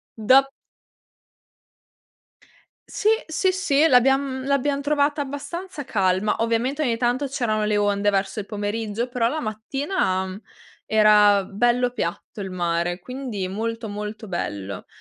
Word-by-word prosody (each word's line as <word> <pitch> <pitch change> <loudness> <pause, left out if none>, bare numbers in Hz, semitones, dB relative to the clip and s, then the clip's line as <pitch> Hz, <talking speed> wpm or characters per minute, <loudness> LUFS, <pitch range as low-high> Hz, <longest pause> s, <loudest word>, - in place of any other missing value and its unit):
Do 260 +5 +4 2.4
Sì, 425 - 0 0.2
sì, 370 +4 +1
sì 320 -6 +2
l'abbiam 265 0 +3
l'abbiam 280 0 +1
trovata 290 +1 +1
abbastanza 290 +4 -5
calma. 195 -2 +1
Ovviamente 230 +5 0
ogni 245 -6 +1
tanto 245 +4 0
c'erano 225 -6 -1
le 210 0 +1
onde 205 0 +1
verso 200 +2 0
il 200 - -7
pomeriggio, 215 +2 -3
però 245 -2 +1
la 310 +5 -2
mattina, 220 - -1
mhmm, 190 +2 -7 0.5
era 210 -2 +5
bello 240 +5 +1
piatto 205 -2 -5
il 190 -1 -5
mare, 175 -1 -1
quindi 250 -4 -5
molto, 225 +3 -4
molto 210 +2 -6
bello, 100 - -5
230 Hz, 125 wpm, -23 LUFS, 205-275 Hz, 2.4 s, era